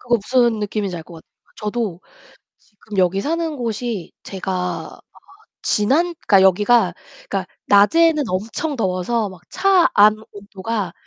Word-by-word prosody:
그거 240 -1 +1
무슨 235 +1 +1
느낌인지 205 -3 -3
알 165 - -7
것 170 +1 -14
같아. 160 - -14 0.3
저도 210 -4 -3 0.6
지금 205 -1 -12
여기 185 +1 +2
사는 325 +3 -2
곳이 230 -5 -4
제가 190 0 -5 0.4
아 - - -20 0.6
지난 295 +12 +1
그러니까 195 -3 +6
여기가 190 +1 +4 0.4
그러니까 195 -2 -2 0.2
낮에는 305 +10 +4
엄청 225 - -3
더워서 200 +1 -1
막 185 -3 -14
차 380 -3 +3
안 210 +1 +6
온도가 200 -1 -5
210 Hz, 280 characters per minute, -20 LUFS, 190-240 Hz, 0.6 s, 그러니까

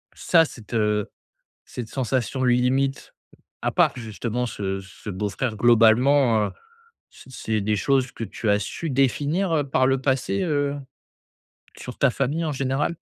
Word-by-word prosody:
ça, 165 -2 +4
cette, 115 -5 -12
heu, 105 -2 +1 0.6
cette 120 -3 -7
sensation 130 0 -2
limite 130 +2 +1 0.5
à - - 0
part - - +3
justement 115 +1 -3
ce 95 -3 -4
ce 95 +2 -10
beau-frère 105 +5 -3
globalement, 115 +1 +4
heu, - - -5 0.6
c - - -17
c'est 110 -1 -2
des 105 +1 0
choses 135 +3 +1
que 115 - -6
tu 105 +2 -4
as 105 0 +3
su 150 +10 -5
définir, 145 +7 +1
heu, 150 - +2
par 130 -1 +3
le 135 0 +2
passé, 135 +8 0
heu, 145 -3 0 1.0
sur 125 - -8
ta 140 - +4
famille 140 +7 -1
en 155 - -1
général? 135 +4 -1
125 Hz, 150 wpm, -23 LUFS, 110-140 Hz, 1.0 s, ça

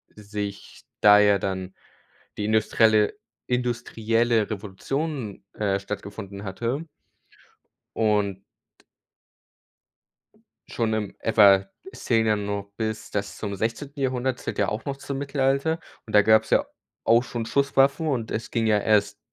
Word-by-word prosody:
sich 105 -1 -7 0.2
da 105 0 +8
ja 105 -1 +4
dann 95 -1 -4 0.6
die 105 - -2
industrielle 110 0 +3 0.3
industrielle 120 -2 0
Revolution, 110 +3 -4
äh, 100 -2 0
stattgefunden 100 0 -7
hatte 120 - -3 1.1
und 105 -3 +1 2.3
schon 115 -1 0
in 105 -2 -2
f 110 -1 -3
a 100 -2 +7 0.2
es - - -11
zählen 115 -1 +2
ja 110 - +3
nur 100 -1 -4
bis 110 -1 -3
das 100 -1 -3
zum 100 -2 -4
16. 115 +8 -4
Jahrhundert 130 -1 -1
zählt - - -5
ja - - +2
auch 105 +1 -5
noch 140 -1 -3
zum 140 0 -5
Mittelalter 140 +3 0 0.3
und 110 - -10
da 105 - +8
gab's 110 +1 +4
ja - - +4 0.4
auch 115 +2 +4
schon 120 -3 -4
Schusswaffen 140 +4 +2
und 120 -6 -1
es 110 - -4
ging 115 -2 0
ja 105 -1 +4
erst 105 0 +2
110 Hz, 135 wpm, -25 LUFS, 105-125 Hz, 2.3 s, da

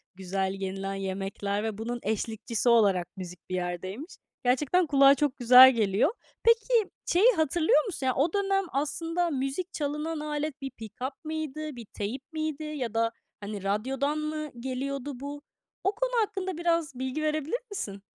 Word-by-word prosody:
güzel 190 0 -2
yenilen 195 0 -4
yemekler 195 +2 -3
ve 220 -2 -3
bunun 240 +2 -3
eşlikçisi 220 +2 -1
olarak 200 -7 +4
müzik 180 -1 -7
bir 185 - -1
yerdeymiş. 185 - -4 0.3
Gerçekten 295 +7 +3
kulağa 275 -1 +7
çok 280 -1 0
güzel 255 +1 +9
geliyor. 215 - +2 0.3
Peki, 460 -2 +4 0.2
şeyi 420 +8 +5
hatırlıyor 320 - +3
musun? 320 -10 -4
Yani, 255 - +3
o 300 +5 +1
dönem 390 -1 +1
aslında 330 +5 -1
müzik 275 +6 -3
çalınan 300 +2 -2
alet 300 -1 -3
bir 270 -1 -4
pikap 255 +6 -7
mıydı, 310 -2 -4
bir 235 -2 -8
teyp 215 +6 -4
miydi 310 -1 -3
ya 275 -7 -4
da 230 0 +1 0.3
hani, 200 -1 -6
radyodan 265 +9 0
mı 305 -1 -3
geliyordu 265 +1 -4
bu? 285 +1 -6 0.4
O 390 - +3
konu - - -1
hakkında 380 -4 -2
biraz 335 -4 +1
bilgi 260 +4 -2
verebilir 310 - -1
misin? 200 - -5
275 Hz, 150 wpm, -28 LUFS, 220-310 Hz, 0.4 s, güzel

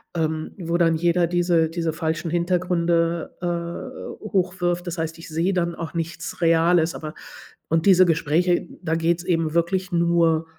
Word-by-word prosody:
ähm, 160 -1 -2
wo 170 0 -1
dann 165 -1 +3
jeder 175 +1 +2
diese 170 -1 +2
diese 165 -1 -2
falschen 160 +1 -2
Hintergründe, 170 -1 0
äh, 175 +11 -5
hochwirft. 180 -1 0
Das 175 -1 -4
heißt, 160 0 -3
ich 165 - -11
sehe 165 +5 0
dann 170 -1 0
auch 165 0 -7
nichts 165 +1 -5
Reales, 165 0 +3
aber 155 0 -7 0.5
und 165 +2 +1
diese 185 -1 +7
Gespräche, 170 +2 +1 0.2
da 160 - -1
geht 165 +1 +1
es - - -7
eben 165 -3 0
wirklich 180 +2 0
nur 170 -1 +2
170 Hz, 160 wpm, -23 LUFS, 165-175 Hz, 0.5 s, diese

